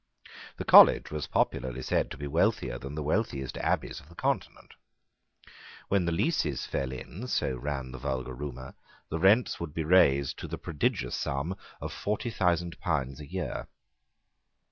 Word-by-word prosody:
The - - -5
college - - +8
was 75 -2 -3
popularly 65 0 -1
said - - +1
to - - -8
be 70 - -5
wealthier 70 - +1
than 70 +3 -7
the 75 - -3
wealthiest 70 - -1
abbeys - - -1
of 75 - -18
the 85 - -15
Continent. - - -2 1.2
When 100 -3 +2
the 85 - 0
leases 80 - 0
fell 65 -1 -2
in, 80 - -7
so 65 - 0
ran 65 0 -4
the 65 - -8
vulgar 65 -1 -3
rumour, 65 -1 -7 0.4
the 80 - -2
rents 105 +7 +4
would 85 -2 -6
be 80 - -1
raised 75 -5 +4
to - - -6
the - - -5
prodigious 70 -5 -1
sum 70 +7 -2 0.2
of - - -5
forty 105 +3 -2
thousand 85 -4 0
pounds 70 -5 -1
a 75 - -9
year. 90 +1 -4
75 Hz, 165 wpm, -29 LUFS, 65-85 Hz, 1.2 s, college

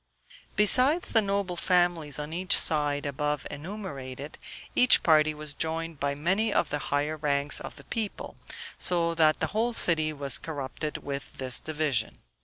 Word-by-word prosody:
Besides 260 - +5
the 225 - +5
noble 200 -3 -1
families 175 -5 +1
on 150 +1 -5
each 185 +2 +3
side 145 -2 0
above 150 +1 -2
enumerated, 145 -5 -7 0.4
each 250 0 +5
party 155 -1 +4
was 150 -1 -3
joined 160 0 -3
by 140 0 -1
many 190 +9 +1
of - - +1
the 145 - -1
higher 145 +2 0
ranks 145 -1 +1
of - - -8
the - - -14
people, 220 -4 -4 0.4
so 170 -2 +1
that 155 -2 +3
the - - +1
whole 230 +3 0
city 155 -7 +2
was 140 -2 0
corrupted 150 -1 -5
with 140 -1 -6
this 130 -2 -2
division. 150 -7 -2
155 Hz, 155 wpm, -27 LUFS, 145-180 Hz, 0.4 s, Besides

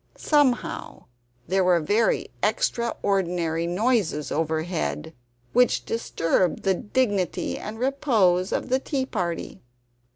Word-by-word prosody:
Somehow 290 -5 0 0.4
there 190 +2 +2
were 180 -1 +4
very 210 +8 +1
extra 235 - 0
ordinary 170 -4 0
noises 185 - 0
overhead, 155 - -2 0.4
which 245 0 +3
disturbed 180 -6 0
the 195 - +3
dignity 205 -2 -1
and 215 +1 -7
repose 225 -9 +2
of - - -2
the 260 +1 +2
tea 270 -1 -2
party. 175 -9 -4
195 Hz, 105 wpm, -25 LUFS, 170-245 Hz, 0.4 s, were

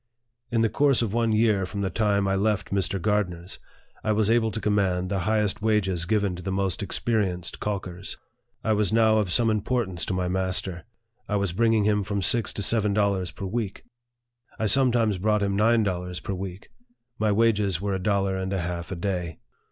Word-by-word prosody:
In 115 -2 +1
the 115 - +4
course 140 -2 +2
of 110 -3 -3
one 115 -1 +1
year 110 -3 +2
from 100 +2 -4
the 95 -2 -1
time 100 0 +1
I 95 - +1
left 100 0 0
Mr. 95 0 0
Gardner's, 95 -3 -2 0.4
I 110 - +1
was 110 0 +2
able 115 -1 +3
to 110 - -4
command 95 -4 0
the 100 0 -1
highest 105 -1 +1
wages 95 -5 +1
given 100 -1 0
to 90 - -8
the 95 +2 -4
most 95 -2 -1
experienced 95 -6 -1
calk 100 -3 -3
ers. 90 +2 -6 0.5
I 110 - +2
was 105 -3 +1
now 110 -1 +4
of 100 -4 -1
some 115 +3 +4
importance 105 -4 -1
to 95 - -1
my 90 -1 -1
master. 95 -1 -1 0.4
I 105 - 0
was 100 -3 0
bringing 115 +1 +2
him 105 0 +2
from 100 0 -2
six 120 +2 +2
to 105 - -2
seven 105 -1 +2
dollars 100 -4 +1
per 100 - -7
week. 105 0 -4 0.7
I 110 - -1
sometimes 115 -4 +3
brought 105 +1 +1
him 100 -1 0
nine 115 +2 +3
dollars 90 -2 -3
per 100 - -5
week: 95 +1 -7 0.5
my 110 -1 +2
wages 105 -4 +2
were 100 +1 -2
a 95 - -2
dollar 100 -1 +1
and 95 0 -3
a 95 - -1
half 85 0 -5
a - - -2
day. 90 -3 -3
100 Hz, 200 wpm, -25 LUFS, 95-110 Hz, 0.7 s, the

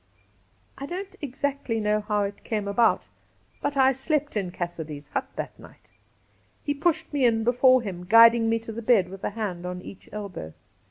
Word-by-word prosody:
I 275 - -5
don't 380 +4 -6
exactly 275 -4 -2
know 210 0 +1
how 210 0 0
it 200 0 -5
came 210 -3 -2
about, 225 +3 +2 0.5
but 285 - -2
I 265 0 +6
slept 290 +2 -1
in 195 -4 -1
Cassidy's 160 -5 -6
hut 275 -1 -2
that - - -6
night. - - -17 0.7
He 290 - 0
pushed 315 +1 0
me 285 -2 +1
in 225 -2 +3
before 250 +1 +4
him, 180 -4 -6
guiding 230 0 +7
me 225 - +2
to 225 - -7
the 230 +1 -6
bed 215 -6 +3
with 195 0 -10
a - - 0
hand 200 -5 -4
on 180 0 -4
each 190 - -12
elbow. 200 - -7
225 Hz, 180 wpm, -26 LUFS, 200-265 Hz, 0.7 s, guiding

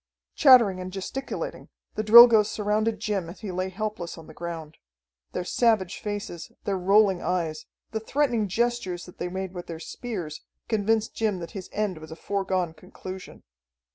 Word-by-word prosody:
Chattering 235 - +6
and 185 0 -6
gesticulating, 195 +8 -5 0.2
the - - -2
Drilgoes 220 -1 +9
surrounded 215 +1 0
Jim 195 -5 -2
as 175 - -11
he 205 - -4
lay 185 +1 -2
helpless 195 -3 -4
on 165 - -11
the 155 - -13
ground. 165 -2 -7 0.6
Their - - -2
savage 210 -2 +1
faces, 205 -5 -5
their 200 - -1
rolling 195 0 +4
eyes, 160 -4 -2 0.2
the 220 - -2
threatening 235 -2 0
gestures 210 -4 -1
that 180 - -15
they 175 - -2
made 190 0 -4
with 175 -1 -7
their 165 -1 -6
spears, 175 -3 -6 0.3
convinced 220 0 +1
Jim 215 -4 0
that 170 -2 -7
his 190 -3 -8
end 205 -5 -2
was 155 0 -11
a 160 - -8
foregone 185 -2 -1
conclusion. 185 +2 -10
190 Hz, 165 wpm, -26 LUFS, 175-215 Hz, 0.6 s, Drilgoes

